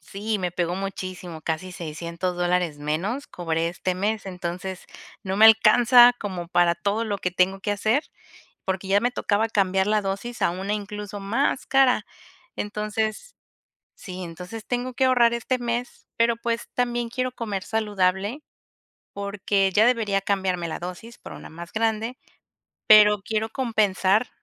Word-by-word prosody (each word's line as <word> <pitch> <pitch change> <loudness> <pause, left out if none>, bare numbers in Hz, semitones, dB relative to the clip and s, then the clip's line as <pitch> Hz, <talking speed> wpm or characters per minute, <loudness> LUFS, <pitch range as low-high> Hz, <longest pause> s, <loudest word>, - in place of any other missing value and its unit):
Sí, 210 +2 -3
me 180 -2 -2
pegó 175 0 -1
muchísimo, 185 -4 -6
casi 170 +3 -3
$600 170 +2 -4
dólares 175 -3 0
menos 180 - -2
cobré 165 -1 -2
este 180 +1 -3
mes, 205 +2 -2
entonces, 180 0 -5 0.4
no 190 0 -3
me 215 - +6
alcanza 240 +3 +7
como 180 -4 -5
para 175 -1 +3
todo 200 +6 -1
lo 205 -3 -2
que 180 - -2
tengo 185 +2 +1
que 205 - -1
hacer, 220 +8 +1 0.6
porque 190 0 -2
ya 200 +1 +4
me 245 - +1
tocaba 220 -2 0
cambiar 190 -2 +1
la 215 0 +2
dosis 200 +5 -4
a - - +3
una 190 +4 -3
incluso 205 -1 -5
más 230 +8 0
cara. 260 -5 +3 0.5
Entonces 215 - -3 0.6
Sí. 185 -4 -8
Entonces, 180 +6 -8
tengo 245 +1 -2
que 265 - +1
ahorrar 245 -2 +4
este 255 +2 -1
mes, 240 0 -4
pero, 230 0 +2
pues, 235 0 -3
también 240 -1 -1
quiero 255 +1 -2
comer 210 -6 -4
saludable, 205 +3 -1 0.7
porque 200 -1 0
ya 215 +5 +5
debería 220 -5 +2
cambiarme 190 -3 -1
la 160 - -5
dosis 185 +7 -8
por - - -10
una - - -10
más 170 +1 -10
grande, 225 +2 -1 0.7
pero 210 -1 +7
quiero 220 +2 -2
compensar 215 -3 +1
205 Hz, 150 wpm, -24 LUFS, 185-225 Hz, 0.7 s, alcanza